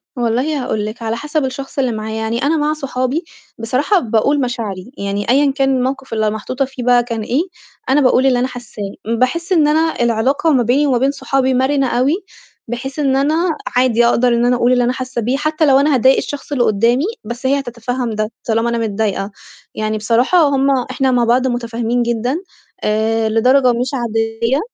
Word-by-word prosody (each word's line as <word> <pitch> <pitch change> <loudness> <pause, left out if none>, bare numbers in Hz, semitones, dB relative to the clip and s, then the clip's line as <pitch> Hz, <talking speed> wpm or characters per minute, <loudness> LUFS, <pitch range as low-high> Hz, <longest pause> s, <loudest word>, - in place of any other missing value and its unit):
والله 250 +4 -1
هاقول 210 -3 -2
لِك 215 +3 -7
على 225 0 -2
حسب 295 +3 -2
الشخص 270 +1 -5
اللي 255 -2 +1
معايا، 220 0 -4
يعني 230 +3 -2
أنا 315 +3 +2
مع 300 +1 +1
صحابي 275 +1 -2 0.3
بصراحة 255 - +1
باقول 260 +3 +1
مشاعري، 230 -4 -4
يعني 200 +2 -3
أيًا 275 +2 +4
كان 270 0 0
الموقِف 265 0 -3
اللي 220 -1 +1
محطوطة 250 +6 -2
فيه 260 -2 -8
بقى 245 -1 +4
كان 230 -2 -4
إيه، 250 +7 0 0.5
أنا 285 +2 +4
باقول 255 0 +3
اللي 255 -2 +3
أنا 250 - +1
حاسّاه. 245 -4 -8 0.4
باحس 335 +9 0
إن 310 -4 +4
أنا 315 -2 +1
العلاقة 240 +7 +1
ما 250 - +3
بيني 265 +6 +2
وما 260 -3 +2
بين 265 +3 +2
صحابي 270 -2 0
مَرِنة 265 +1 +1
أوي 255 +4 +1 0.5
بحيث 265 +5 -5
إن 275 -3 +2
أنا 285 +3 +2 0.4
عادي 245 -2 +3
أقدر 240 +1 +3
إن 240 0 +2
أنا 245 0 +3
أقول 240 0 +2
اللي 245 -1 +2
أنا 245 - +1
حاسّة 255 -1 -4
بيه، 245 +5 0
حتى 310 +2 0
لو 270 -2 +5
أنا 290 +1 +2
هاضايق 260 +1 +4
الشخص 290 0 -5
اللي 265 -4 +2
قُدّامي، 235 +7 +2 0.2
بس 240 +4 -7
هي 275 +2 +2
هتتفهّم 245 -1 -4
ده 215 0 -2 0.2
طالما 225 +1 +1
أنا 235 - -1
متضايقة، 210 -2 -2 0.4
يعني 215 0 -2
بصراحة 235 - +2
هم 275 -1 +1 0.2
إحنا 265 -1 +1
مع 245 -1 +2
بعض 245 +3 +2
مُتفاهمين 240 0 -1
جدًا 235 +4 -1 0.5
آآ، 220 +1 +1
لدرجة 255 +4 +3
مش 245 +2 -1
عادية. 230 +1 -1
250 Hz, 190 wpm, -17 LUFS, 230-275 Hz, 0.5 s, لو